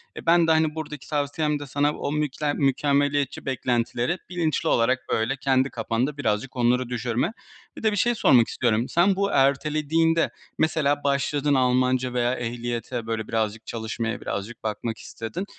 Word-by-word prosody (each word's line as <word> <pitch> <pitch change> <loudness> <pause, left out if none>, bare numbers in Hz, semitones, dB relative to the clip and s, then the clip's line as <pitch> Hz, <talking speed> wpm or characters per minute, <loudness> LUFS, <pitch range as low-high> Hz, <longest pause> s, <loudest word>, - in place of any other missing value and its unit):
Eee, - - -9
ben 170 0 +5
de, - - +4
hani, 160 -1 +2
buradaki 150 -3 -6
tavsiyem 150 0 0
de 145 - -7
sana 145 +2 +1
o 140 - -3
mükle 150 0 -1
mükemmeliyetçi 140 0 +1
beklentileri 125 +3 0
bilinçli 165 -4 0
olarak, 125 +3 +3
böyle, 115 +5 +1
kendi 130 0 +2
kafanda 120 +5 -2
birazcık 120 0 -1
onları 125 0 +2
düşürme. 125 - -1 0.4
Bir - - -9
de 220 - +3
bir 205 - -2
şey 240 +4 +2
sormak 125 - +5
istiyorum. 120 -1 0
Sen 185 +3 +3
bu 200 +1 0
ertelediğinde, 155 +4 +2 0.3
mesela 150 -2 +1
başladın 140 +1 +1
Almanca 130 -1 +2
veya 120 0 +1
ehliyete, 120 0 -4
böyle, 110 -1 -3
birazcık 110 0 -2
çalışmaya 115 0 -4
birazcık 100 +4 -5
bakmak 110 +1 -3
istedin. 115 - -6
135 Hz, 155 wpm, -25 LUFS, 120-150 Hz, 0.4 s, ben